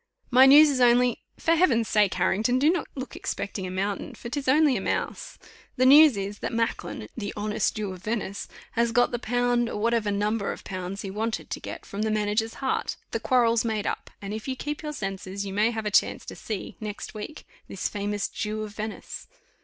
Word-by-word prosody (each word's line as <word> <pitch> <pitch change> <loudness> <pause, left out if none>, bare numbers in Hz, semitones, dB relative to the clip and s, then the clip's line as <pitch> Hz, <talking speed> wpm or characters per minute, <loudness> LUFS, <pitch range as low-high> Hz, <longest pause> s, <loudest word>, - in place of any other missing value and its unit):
"My 260 +2 +8
news 295 +2 +8
is 265 - -1
only 245 0 +4 0.2
for 330 - 0
Heaven's 260 -10 +3
sake, 210 -2 +3
Harrington, 215 +7 +2
do 295 +5 +4
not 350 -3 -2
look 260 -2 -6
expecting 190 -1 -4
a - - -5
mountain, 195 +2 -3
for 235 - -8
'tis 280 +1 -4
only 290 0 +5
a 200 - -1
mouse. - - -3 0.4
The 255 - +2
news 290 -2 +8
is, 200 +1 -4
that - - -3
Macklin, 230 0 -2
the 205 -4 -4
honest 210 +1 0
Jew 210 -3 -3
of 180 - -11
Venice, 210 -2 -3 0.2
has 235 0 +1
got 245 +1 +3
the 240 - -2
pound, 245 0 +1
or - - -4
whatever 230 -1 +1
number 205 +1 0
of - - -8
pounds 185 +1 -5
he 195 - -5
wanted 220 +3 -3
to - - -3
get - - -8
from 200 - -5
the 220 - +1
manager's 215 +1 0
heart; 265 -1 -1 0.2
the - - -1
quarrel's 235 -3 +3
made 220 -3 -1
up, - - -3
and 200 +1 -4
if 215 +2 -6
you 265 - -2
keep 295 +3 -4
your 300 -1 -4
senses, 195 -4 -4
you 195 - -5
may 210 +3 +3
have 220 -2 -4
a 210 - -1
chance - - +2
to - - -8
see, 210 -4 -6
next 210 -1 -6
week, 215 +8 -8 0.2
this - - -3
famous 205 0 -2
Jew 215 +1 -3
of 215 - -7
Venice." 215 0 -6
220 Hz, 215 wpm, -26 LUFS, 205-245 Hz, 0.4 s, My